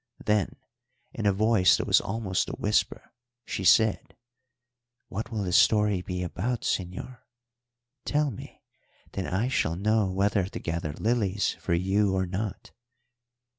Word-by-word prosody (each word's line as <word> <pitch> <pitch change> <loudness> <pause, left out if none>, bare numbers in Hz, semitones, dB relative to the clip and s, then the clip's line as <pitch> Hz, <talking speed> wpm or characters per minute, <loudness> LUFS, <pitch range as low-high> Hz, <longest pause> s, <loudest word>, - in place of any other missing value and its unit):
Then, 105 -3 +1 0.6
in 105 - -1
a - - +5
voice 105 -2 +4
that - - -3
was - - +4
almost 100 -3 -2
a - - -5
whisper, 105 0 -1 0.3
she 95 - -4
said, 110 +3 +3 0.9
"What 110 +4 -4
will 110 -3 -3
the 90 -2 -3
story 105 -2 +4
be 90 0 -4
about, 110 +7 -3
señor? 95 +7 -3 0.8
Tell 150 -1 0
me, 100 - -11 0.5
then 95 -4 -4
I 95 +9 0
shall 85 -10 0
know 105 +1 +1
whether 100 0 +1
to - - -7
gather 80 -2 -3
lilies 105 0 0
for 85 - 0
you 95 +2 +1
or 95 0 +1
not." 95 +2 -5
100 Hz, 140 wpm, -27 LUFS, 95-110 Hz, 0.9 s, a